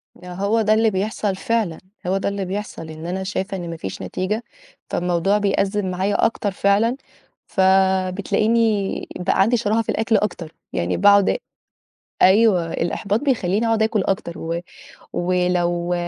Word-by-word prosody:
ده 180 Hz, 0 st, -10 dB
هو 200 Hz, +5 st, +1 dB
ده 215 Hz, 0 st, +3 dB
اللي 220 Hz, +1 st, +3 dB
بيحصل 200 Hz, 0 st, -1 dB
فعلًا، 210 Hz, -5 st, -1 dB, 0.3 s
هو 190 Hz, +2 st, +1 dB
ده 195 Hz, -, -1 dB
اللي 200 Hz, -1 st, -3 dB
بيحصل 185 Hz, -4 st, -5 dB
إن 155 Hz, +1 st, -8 dB
أنا 185 Hz, +2 st, -3 dB
شايفة 190 Hz, 0 st, -3 dB
إن 175 Hz, -2 st, -6 dB
ما 165 Hz, -, -5 dB
فيش 95 Hz, -11 st, -6 dB
نتيجة، 185 Hz, -, -3 dB, 0.5 s
فالموضوع 180 Hz, +3 st, +1 dB
بيأزِّم 200 Hz, 0 st, 0 dB
معايا 190 Hz, +4 st, +1 dB
أكتر 220 Hz, -2 st, -1 dB
فعلًا، 200 Hz, +5 st, +2 dB, 0.5 s
فبتلاقيني 195 Hz, +3 st, +2 dB
بقى 180 Hz, +1 st, +1 dB
عندي 230 Hz, +5 st, +3 dB
شَراهة 220 Hz, 0 st, +1 dB
في 225 Hz, -, -9 dB
الأكل 225 Hz, 0 st, +2 dB
أكتر. 180 Hz, -6 st, -3 dB, 0.2 s
يعني 85 Hz, +1 st, -1 dB
باقعُد 200 Hz, -, +5 dB, 0.8 s
أيوه، 190 Hz, -4 st, +4 dB
الإحباط 200 Hz, +5 st, -1 dB
بيخلّيني 225 Hz, -6 st, 0 dB
أقعُد 225 Hz, -1 st, +2 dB
آكُل 220 Hz, -3 st, +1 dB
أكتر 185 Hz, -3 st, -2 dB
و 165 Hz, +1 st, -3 dB, 0.5 s
ولو 175 Hz, -1 st, 0 dB
195 Hz, 145 wpm, -21 LUFS, 180-215 Hz, 0.8 s, باقعُد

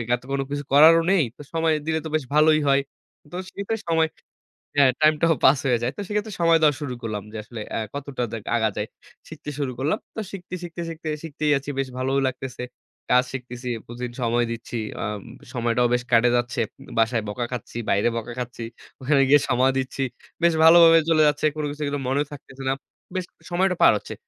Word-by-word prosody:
এত 125 Hz, -, -12 dB
কোনো 135 Hz, 0 st, 0 dB
কিছু 145 Hz, 0 st, -2 dB
করারও 160 Hz, +3 st, +8 dB
নেই। 185 Hz, -6 st, +4 dB
তো -, -, -10 dB
সময় 165 Hz, -1 st, +2 dB
দিলে 160 Hz, 0 st, 0 dB
তো -, -, -4 dB
বেশ 155 Hz, -, 0 dB
ভালোই 155 Hz, 0 st, +5 dB
হয়। 140 Hz, 0 st, +4 dB, 0.5 s
তো -, -, -8 dB, 0.2 s
সেই 200 Hz, -, -5 dB, 0.3 s
সময় 160 Hz, -1 st, +3 dB, 0.7 s
হ্যাঁ, 135 Hz, -3 st, +6 dB
টাইমটাও 155 Hz, +1 st, +4 dB
পাস 130 Hz, +1 st, +6 dB
হয়ে 120 Hz, -2 st, +3 dB
যায়। 120 Hz, +2 st, 0 dB
তো 205 Hz, -, -5 dB
সেক্ষেত্রে 210 Hz, 0 st, -2 dB
সময় 165 Hz, -1 st, +5 dB
দেওয়া 150 Hz, -2 st, +5 dB
শুরু 135 Hz, -4 st, -3 dB
করলাম, 105 Hz, -3 st, -4 dB
যে -, -, -5 dB
আসলে 110 Hz, 0 st, -8 dB
আ -, -, 0 dB
কতটা 140 Hz, -3 st, -4 dB
দেক 110 Hz, -2 st, -5 dB
আগা 110 Hz, -2 st, +2 dB
যায়। 105 Hz, +1 st, -2 dB, 0.4 s
শিখতে 155 Hz, -1 st, -8 dB
শুরু 135 Hz, -3 st, -1 dB
করলাম। 145 Hz, +4 st, 0 dB, 0.2 s
তো -, -, -4 dB
শিখতে, 180 Hz, -2 st, -7 dB
শিখতে 170 Hz, 0 st, -6 dB, 0.4 s
শিখতেই 150 Hz, -1 st, -1 dB
আছি। 140 Hz, +1 st, -7 dB
বেশ 135 Hz, -, 0 dB
ভালোও 135 Hz, +2 st, +1 dB
লাগতেছে। 125 Hz, -1 st, -5 dB, 0.5 s
কাজ 125 Hz, +1 st, +5 dB
শিখতেছি, 125 Hz, -1 st, -6 dB, 0.2 s
প্রতিদিন 120 Hz, 0 st, -6 dB
সময় 120 Hz, +1 st, +2 dB
দিচ্ছি। 115 Hz, +1 st, -5 dB, 0.3 s
আ -, -, -1 dB, 0.5 s
সময়টাও 120 Hz, 0 st, +1 dB
বেশ 125 Hz, -, +1 dB
কেটে 120 Hz, +1 st, +5 dB
যাচ্ছে। 120 Hz, 0 st, 0 dB, 0.4 s
বাসায় 115 Hz, 0 st, +2 dB
বকা 120 Hz, +3 st, -3 dB
খাচ্ছি, 120 Hz, -1 st, -6 dB
বাইরে 100 Hz, +4 st, +3 dB
বকা 115 Hz, +1 st, -5 dB
খাচ্ছি। 120 Hz, -1 st, -5 dB, 0.4 s
ওখানে 135 Hz, +1 st, +3 dB
গিয়ে 145 Hz, -1 st, +6 dB
সময় 130 Hz, +1 st, +3 dB
দিচ্ছি। 130 Hz, +1 st, -3 dB, 0.4 s
বেশ 170 Hz, -, +5 dB
ভালোভাবে 165 Hz, 0 st, +8 dB
চলে 155 Hz, -1 st, +4 dB
যাচ্ছে। 150 Hz, +1 st, +1 dB
কোন 155 Hz, -, -3 dB
কিছু 150 Hz, +1 st, -5 dB
কিন্তু 145 Hz, 0 st, -2 dB
মনেও 140 Hz, +3 st, +1 dB
থাকতেছে 135 Hz, -1 st, -10 dB
না। -, -, +3 dB, 0.4 s
বেশ 185 Hz, -, -1 dB, 0.3 s
সময়টা 185 Hz, +1 st, +2 dB
পার -, -, +8 dB
হচ্ছে। -, -, -8 dB
135 Hz, 195 wpm, -24 LUFS, 120-155 Hz, 0.7 s, করারও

